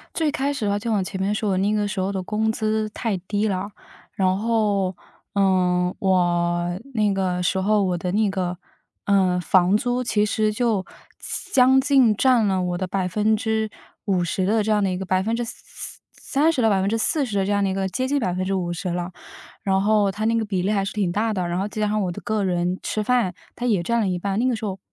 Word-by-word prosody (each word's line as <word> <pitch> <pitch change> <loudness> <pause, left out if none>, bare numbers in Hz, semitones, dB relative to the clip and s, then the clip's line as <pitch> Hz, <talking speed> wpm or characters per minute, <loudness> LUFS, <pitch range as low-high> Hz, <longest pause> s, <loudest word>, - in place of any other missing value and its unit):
最 315 -3 +1
开 285 -1 -1
始 260 -7 -3
的 200 - +1
话 205 - +1
就 225 +1 -2
往 200 -3 +2
前 190 +1 -5
面 200 +2 +1
说， 210 -1 -1
我 190 - +1
那 200 +3 +1
个 210 -1 0
时 205 -1 -5
候 190 +2 0
的 190 - -2
工 220 +3 0
资 215 0 -1
太 220 -2 -2
低 205 +4 -1
了。 195 +1 -2 0.4
然 185 -1 +1
后， 210 -4 +1 0.4
呃， 180 -2 +2
我 175 -1 +1 0.2
那 210 -3 +2
个 180 -2 -1
时 190 +2 +1
候， 205 +2 +2
我 180 -2 0
的 180 +1 -3
那 210 0 +2
个， 180 -2 -2 0.5
呃， 185 -3 +3
房 180 +2 +3
租 245 +2 -1
其 210 -3 +2
实 215 0 +1
就 215 -4 0 0.7
将 265 +1 +6
近 265 -5 +4
占 245 -2 +3
了 190 -2 +1
我 180 -1 -2
的 185 - -2
50% 205 -1 -1
的 215 +3 +2
这 215 - -2
样 210 -1 +3
的 190 - +1
一 180 - -2
个 190 - -5
30% 235 - -2
到 225 - +4
40% 215 +4 +1
的 195 - +1
这 - - -1
样 200 -1 +2
的 190 - +1
一 - - -2
个 195 0 -1
接 255 +8 -2
近 285 +1 +1
50% 185 -1 -2
了。 175 +1 -3 0.5
然 190 -1 +1
后 210 -1 +3
它 215 +3 -3
那 230 0 +2
个 225 - 0
比 200 -3 -2
例 190 +3 0
还 200 -2 +1
是 195 - -4
挺 200 -4 0
大 215 +5 0
的， 180 -3 -2
然 175 +1 -1
后 195 - -1
再 215 +1 -6
加 210 - +1
上 215 +1 0
我 180 -2 -1
的 - - -7
个 215 -1 -1
人 180 0 0
吃 215 - -2
饭， 235 -5 +1 0.2
它 245 - -5
也 205 -8 +2
占 235 +6 0
了 220 - +1
一 180 -2 -1
半， 195 +2 -2
那 245 - +2
个 250 - +2
时 220 -1 -4
候， 195 -1 -4
200 Hz, 225 characters per minute, -23 LUFS, 185-220 Hz, 0.7 s, 将